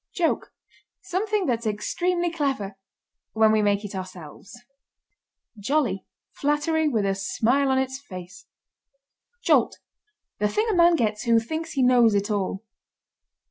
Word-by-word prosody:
JOKE. 340 -3 0 0.5
Something 400 +2 -1
that's 235 -3 -1
extremely 345 - -1
clever 270 - -2 0.6
when 220 0 +4
we 215 0 +3
make 205 0 +1
it 205 - -7
ourselves. 185 - -9 1.0
JOLLY. 215 -5 0 0.2
Flattery 300 +2 0
with 225 -8 0
a 195 - +1
smile 235 +8 +1
on 265 - +2
its 265 0 -1
face. 185 -7 -11 1.0
JOLT. - - +3 0.6
The 210 - +2
thing 425 - 0
a - - 0
man 345 -1 +5
gets 215 -5 -1
who 230 -1 +4
thinks 315 +8 -5
he 270 - +1
knows 240 -4 +5
it 205 +2 0
all. 195 0 -2
235 Hz, 135 wpm, -25 LUFS, 205-305 Hz, 1.0 s, man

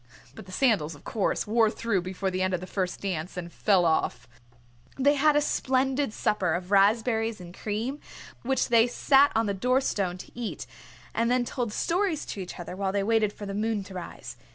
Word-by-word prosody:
But 185 - -11
the - - -10
sandals, 185 - +1
of 145 - -17
course, 210 -4 -1
wore 225 +1 +3
through 220 -4 -1
before 185 +2 -3
the 185 0 -2
end 185 0 +1
of - - -3
the 185 - -7
first 185 -1 -3
dance 180 -3 -3
and 170 -1 -6
fell 190 -4 +3
off. 160 -1 0 0.7
They 280 +2 +4
had 295 +1 +3
a 295 - +4
splendid 265 -1 0
supper 190 -6 0
of 180 +2 -5
raspberries 220 +2 +3
and 175 -1 -10
cream, 225 +7 -3 0.4
which 265 +2 0
they 230 0 +5
sat 275 +3 +4
on 225 +1 +2
the 200 - -1
door 250 +7 +2
stone 195 -9 -1
to - - -11
eat, 240 -2 -5 0.5
and 230 +1 +1
then 250 0 +2
told 240 -3 -3
stories 345 - 0
to - - -8
each 180 - -8
other, 175 +1 -6
while 190 0 -1
they 200 0 0
waited 220 -1 +2
for 205 - -9
the 200 - -5
moon 215 0 -1
to 190 - -11
rise. 180 -2 -8
210 Hz, 205 wpm, -27 LUFS, 185-245 Hz, 0.7 s, they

